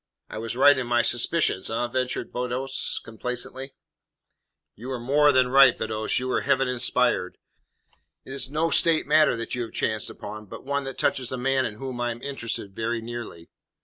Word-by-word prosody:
"I - - -5
was 115 +1 -4
right 145 +3 +7
in 125 - -3
my 120 0 +3
suspicions, 120 - +1
eh?" 115 +2 -1
ventured 125 +1 -2
Beddoes 125 +2 -2
complacently. 125 +3 -6 1.0
"You 120 +5 -10
were 130 -2 -3
more 145 +4 +4
than 130 -2 +3
right, 135 -2 +7
Beddoes, 110 0 -2
you 130 - -2
were 130 - 0
Heaven 135 - +2
inspired. 125 -6 0 0.9
It 135 - -8
is 135 -1 0
no 160 +3 0
State 165 -2 +4
matter 150 -2 +4
that 115 0 -5
you 125 - -2
have 115 - -6
chanced 110 -1 0
upon, 105 0 -9
but - - -10
one 140 0 -1
that 135 - -6
touches 125 -3 0
a 130 - -3
man 130 0 +1
in 105 - -8
whom 125 +1 -6
I 120 - 0
am 120 +1 -6
interested 115 -7 -5
very 115 +1 -2
nearly." 115 -7 -8
125 Hz, 185 wpm, -25 LUFS, 115-135 Hz, 1.0 s, right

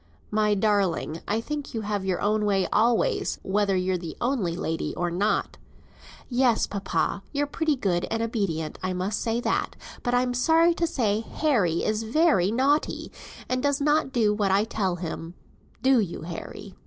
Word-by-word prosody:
"My 210 0 +2
darling, 195 -6 0
I 210 +2 +1
think 290 0 -5
you 225 - -1
have 205 -2 -2
your 190 -2 -1
own 210 +1 +1
way 195 -2 +2
always, 240 - +2
whether 200 0 +1
you're 185 0 0
the 170 -2 -7
only 240 -9 0
lady 165 -2 -3
or 175 -1 -1
not." 200 +5 0 0.7
"Yes, 245 -2 +2
papa, 200 0 -1
you're 290 0 0
pretty 305 +1 0
good 185 -8 0
and 225 0 -1
obedient, 195 -9 -2
I 185 0 -1
must 185 +3 -2
say 230 0 0
that; - - -1 0.3
but 245 0 0
I'm 245 0 +1
sorry 325 +7 +4
to 335 0 0
say 215 -9 0
Harry 225 - 0
is 215 0 0
very 225 - +3
naughty, 275 +7 +1 0.4
and 255 0 0
does 285 +1 +1
not 295 -1 +2
do 225 -5 +2
what 205 -2 0
I 195 +2 +3
tell 195 -5 -1
him; 165 0 -6 0.5
do 265 -1 +5
you, 180 -7 -3
Harry?" 180 +4 -8
215 Hz, 170 wpm, -26 LUFS, 190-255 Hz, 0.7 s, do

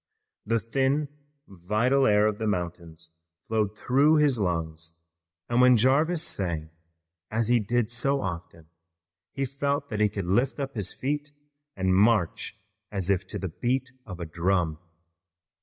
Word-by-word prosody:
The 115 +1 +2
thin 135 +6 0 0.4
vital 110 +9 +1
air 105 0 +4
of 105 -1 0
the 110 - -1
mountains 85 -3 -4 0.4
flowed 110 -2 0
through 140 +7 +3
his 145 -6 +3
lungs, 80 -3 -3 0.5
and 120 +1 +2
when 125 -1 +7
Jarvis 150 +8 +3
sang, 80 - -3 0.6
as 115 +1 -1
he 120 -1 +5
did 115 +2 0
so 135 +4 0
often, 85 -5 -6 0.7
he 135 - -2
felt 140 +1 -2
that 105 - -3
he 105 -1 +4
could 100 -2 -4
lift 120 +11 +1
up 140 -1 -3
his 105 -4 -3
feet 145 +2 -3 0.4
and 95 -1 +1
march 105 -2 +2 0.4
as 100 -2 0
if 95 0 0
to - - -5
the 95 - -4
beat 130 +1 0 0.2
of 90 -3 -7
a 85 - -4
drum. 85 -1 0
105 Hz, 150 wpm, -27 LUFS, 90-130 Hz, 0.7 s, when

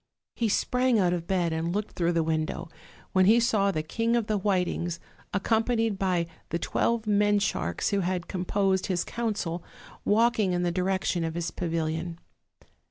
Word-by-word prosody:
He 230 -2 0
sprang 250 +3 +2
out 180 -3 +3
of 170 -1 -3
bed 175 -4 +1
and 165 +3 -2
looked 210 +1 -2
through 175 0 0
the 165 -1 +2
window, 160 +1 -2 0.4
when 185 0 +4
he 220 +4 +6
saw 215 -4 +2
the 155 -5 -1
King 230 +8 0
of 235 -2 +1
the 215 - 0
Whitings, 180 -3 0 0.3
accompanied 225 0 +1
by 180 -3 +1 0.2
the 170 - -1
twelve 230 +6 0
men 205 0 +3
sharks 85 - -1
who 200 -1 +1 0.2
composed 190 +1 0
his 180 -3 0
council, 200 -7 -3 0.4
walking 220 -3 +3
in 175 0 0
the 175 - +1
direction 185 -1 0
of 165 0 -3
his 170 -1 -2
pavilion. 165 0 -2
185 Hz, 165 wpm, -27 LUFS, 170-210 Hz, 0.4 s, he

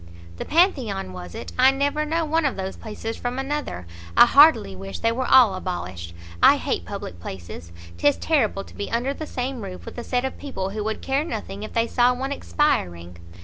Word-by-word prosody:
"The - - -5
Pantheon, 260 - +1
was 90 -1 -9
it? - - -7
I 260 +1 +7
never 285 +3 0
know 325 +2 0
one 320 +2 +1
of 275 - 0
those 190 0 -4
places 225 +1 -6
from 245 +1 -4
another. 270 - -3 0.3
I - - +10
heartily 275 - +6
wish 95 +1 -7
they 230 - +1
were 255 +2 -2
all 250 -6 +7
abolished; 90 - -5 0.3
I - - +7
hate - - -2
public 85 - -7
places. 85 -1 -8 0.3
'Tis 145 +10 +3
terrible 225 -11 +1
to - - -15
be 205 - -5
under 245 +4 -1
the 310 +1 -7
same 255 -1 -4
roof 185 -2 -8
with - - -8
a - - -5
set 250 +1 -1
of 265 - -5
people 195 -10 -4
who 210 +1 -3
would 220 0 -3
care 275 +2 0
nothing 215 -9 -6
if 215 - -7
they 230 0 +2
saw 245 +1 +2
one 265 +2 -4
expiring!" 90 - -1
230 Hz, 205 wpm, -23 LUFS, 185-275 Hz, 0.3 s, I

